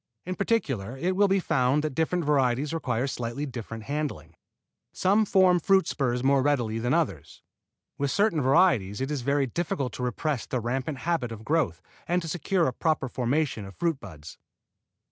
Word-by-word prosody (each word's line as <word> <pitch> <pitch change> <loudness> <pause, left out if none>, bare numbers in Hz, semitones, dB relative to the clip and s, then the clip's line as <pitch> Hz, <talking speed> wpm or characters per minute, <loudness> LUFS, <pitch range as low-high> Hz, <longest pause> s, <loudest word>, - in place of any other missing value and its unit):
In 185 - -3
particular 135 - -1
it 180 +7 -1
will 200 +1 +4
be 195 0 +2
found 135 -3 +1
that 155 -3 -2
different 160 +3 0
varieties 140 0 +1
require 130 -6 -1
slightly 125 +1 -3
different 115 -4 -7
handling. 140 - -4 0.6
Some 205 +4 +2
form 185 -2 +4
fruit 190 +3 +3
spurs 125 -3 -1
more 135 0 +4
readily 120 -6 0
than 120 +2 -1
others. 135 - -1 0.6
With 140 0 0
certain 200 -2 +2
varieties 130 - +3
it 135 +2 -2
is 145 -3 -2
very 140 +2 +1
difficult 135 -3 -2
to 125 - -5
repress 125 +2 -2
the 125 - -1
rampant 130 +5 -2
habit 165 -9 0
of 110 -1 -8
growth 145 - 0 0.2
and 175 +1 +2
to - - -5
secure 175 +2 0
a 130 - 0
proper 155 -1 0
formation 125 -1 -1
of 95 0 -10
fruit 165 -5 -1
buds. 80 - -11
140 Hz, 175 wpm, -27 LUFS, 120-165 Hz, 0.6 s, will